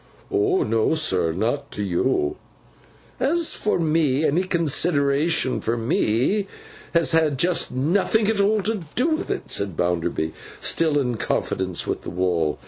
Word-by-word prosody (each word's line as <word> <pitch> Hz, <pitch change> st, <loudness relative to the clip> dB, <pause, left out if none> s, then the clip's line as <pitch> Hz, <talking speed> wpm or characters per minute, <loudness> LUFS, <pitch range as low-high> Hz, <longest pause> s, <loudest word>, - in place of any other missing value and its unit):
'O 400 Hz, -1 st, +2 dB
no, 115 Hz, +7 st, +1 dB
sir. 95 Hz, -, +1 dB
Not 120 Hz, -, -2 dB
to 105 Hz, -, -3 dB
yo.' 90 Hz, -, 0 dB, 0.8 s
'As 325 Hz, +4 st, +2 dB
for 210 Hz, -, 0 dB
me, 155 Hz, -3 st, +1 dB
any 155 Hz, +5 st, +2 dB
consideration 150 Hz, -4 st, +1 dB
for 115 Hz, +1 st, -1 dB
me 120 Hz, -, +1 dB, 0.5 s
has 170 Hz, -1 st, +4 dB
had 160 Hz, -4 st, +2 dB
just 175 Hz, +5 st, +1 dB
nothing 190 Hz, -, +1 dB
at 215 Hz, -2 st, +2 dB
all 210 Hz, 0 st, +2 dB
to 215 Hz, -1 st, -2 dB
do 265 Hz, +7 st, +2 dB
with 320 Hz, +3 st, -2 dB
it,' 400 Hz, -1 st, -4 dB
said 100 Hz, -4 st, -2 dB
Bounderby, 85 Hz, -2 st, -1 dB, 0.3 s
still 160 Hz, -3 st, +1 dB
in 125 Hz, -5 st, 0 dB
confidence 95 Hz, -4 st, -2 dB
with -, -, -3 dB
the -, -, -7 dB
wall. 85 Hz, -4 st, 0 dB
145 Hz, 145 wpm, -23 LUFS, -, 0.8 s, has